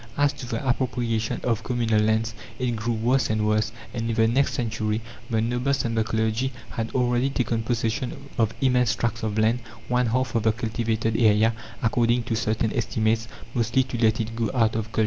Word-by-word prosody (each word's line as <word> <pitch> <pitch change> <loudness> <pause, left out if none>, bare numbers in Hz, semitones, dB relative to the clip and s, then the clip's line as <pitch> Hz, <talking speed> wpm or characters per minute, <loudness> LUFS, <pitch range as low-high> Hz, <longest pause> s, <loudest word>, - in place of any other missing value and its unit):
As 145 0 +3
to 125 - -8
the 135 +2 -3
appropriation 120 -3 0
of 115 -4 0
communal 115 -4 +1
lands, 110 +1 +1 0.2
it 125 -1 -1
grew 115 +2 -1
worse 125 +4 +2
and 110 -1 +1
worse, 110 +1 +1 0.2
and 115 -1 -2
in 115 - 0
the 110 0 +4
next 135 +5 +2
century 110 -3 -1 0.3
the 110 -1 +1
nobles 125 +3 0
and 115 -1 -1
the 110 - +2
clergy 110 +4 0 0.2
had 115 -1 -3
already 125 +1 +2
taken 120 -4 0
possession 115 +1 -1 0.2
of 110 -1 +3
immense 125 -4 +3
tracts 115 0 -2
of 110 -1 -2
land 110 +3 +3 0.3
one 125 0 +2
half 130 +1 0
of 115 - +2
the 110 0 +3
cultivated 110 -1 -1
area, 110 0 +4 0.3
according 120 +1 +2
to 115 0 -2
certain 110 0 0
estimates 110 -1 0 0.3
mostly 120 +2 +2
to 125 -2 -3
let 110 0 +3
it 115 0 -3
go 115 -1 0
out 115 -3 +3
of 110 -2 -1
culture. - - -2
115 Hz, 195 wpm, -25 LUFS, 110-125 Hz, 0.3 s, the